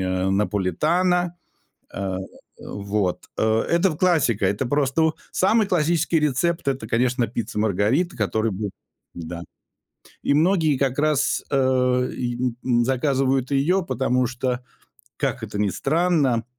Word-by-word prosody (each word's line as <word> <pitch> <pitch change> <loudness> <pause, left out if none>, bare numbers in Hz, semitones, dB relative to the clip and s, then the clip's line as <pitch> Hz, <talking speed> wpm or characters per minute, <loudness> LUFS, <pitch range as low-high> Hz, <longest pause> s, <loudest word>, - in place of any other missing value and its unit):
э, 95 0 0
Наполитано. 155 - +1 0.6
Э, 95 -1 -3 0.4
вот. 100 -2 -2
Э, 110 0 +2
это 170 +3 +3
в 155 - -5
классика, 150 - +2
это 100 +7 0
просто 145 +4 +1 0.2
самый 215 +3 +3
классический 165 -2 +1
рецепт 150 +4 0
это, 130 -5 -2
конечно, 125 +1 +1
пицца 115 -2 -4
Маргарита, 110 - +1
а, - - -18
которая 110 +2 0
будет 100 +1 -4 0.4
Да. 85 0 -7 0.8
И 140 - +2
многие 160 -2 +3
как 135 0 0
раз, 150 -2 +1
э, 130 -2 +2
и, 120 -1 -2
н 125 -1 -2
м, 120 -2 +2
заказывают 135 0 +1
ее, 165 +7 +2
потому 130 0 +1
что, 125 +1 -2 0.6
как - - -2
это 100 - -5
ни 105 -2 +1
странно, 145 - +1
130 Hz, 135 wpm, -23 LUFS, 110-155 Hz, 0.8 s, это